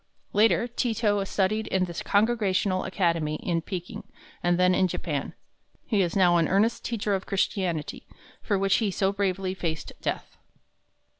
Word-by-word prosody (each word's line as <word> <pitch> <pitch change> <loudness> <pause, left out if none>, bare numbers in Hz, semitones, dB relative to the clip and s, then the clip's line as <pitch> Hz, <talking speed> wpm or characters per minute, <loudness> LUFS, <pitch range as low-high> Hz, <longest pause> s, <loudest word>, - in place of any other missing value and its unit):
Later 210 +1 +3
Ti 240 -1 -1
to 205 -3 +1
studied 215 +3 0
in 190 -1 +1
the 175 - -7
Congregational 200 -2 +1
Academy 165 -5 0
in 165 +1 -1
Peking, 175 +1 -6 0.4
and 175 0 +2
then 180 0 +4
in 185 +1 +3
Japan. 155 -4 -4 0.5
He 210 -4 +1
is 175 -3 -1
now 180 -3 +5
an 165 -2 +2
earnest 210 +5 +1
teacher 210 -3 -1
of 190 -1 -2
Christianity, 185 -5 -2 0.3
for 205 - 0
which 195 0 +2
he 220 -3 0
so 195 +1 0
bravely 195 -2 -1
faced 165 -4 -4
death. - - -4
190 Hz, 155 wpm, -26 LUFS, 175-205 Hz, 0.5 s, now